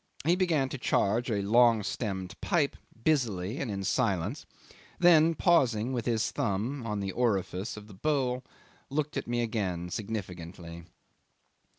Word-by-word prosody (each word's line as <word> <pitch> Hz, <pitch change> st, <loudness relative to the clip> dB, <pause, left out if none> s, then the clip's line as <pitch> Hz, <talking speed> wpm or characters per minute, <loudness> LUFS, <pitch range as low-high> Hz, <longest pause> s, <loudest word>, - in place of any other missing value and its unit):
He 170 Hz, +2 st, +4 dB
began 165 Hz, -7 st, +2 dB
to 135 Hz, -, -5 dB
charge 120 Hz, +2 st, +1 dB
a 100 Hz, -3 st, 0 dB
long 115 Hz, +1 st, +5 dB
stemmed 95 Hz, -3 st, -3 dB
pipe 160 Hz, -7 st, +1 dB, 0.3 s
busily 115 Hz, -8 st, +1 dB
and 135 Hz, -, -2 dB
in 100 Hz, -1 st, -3 dB
silence, 95 Hz, -5 st, 0 dB, 0.5 s
then, 165 Hz, -2 st, +6 dB
pausing 130 Hz, -, +3 dB
with 120 Hz, -2 st, -2 dB
his 115 Hz, -2 st, +1 dB
thumb 115 Hz, +6 st, -2 dB
on 105 Hz, -2 st, -2 dB
the 95 Hz, -1 st, -2 dB
orifice 100 Hz, -3 st, -1 dB
of 105 Hz, -, -9 dB
the 105 Hz, -, -12 dB
bowl, 130 Hz, +2 st, 0 dB, 0.5 s
looked 150 Hz, +2 st, -2 dB
again 115 Hz, -5 st, -1 dB
at -, -, -5 dB
me 90 Hz, -, -6 dB
significantly. 90 Hz, -5 st, -6 dB
115 Hz, 145 wpm, -29 LUFS, 100-135 Hz, 0.5 s, then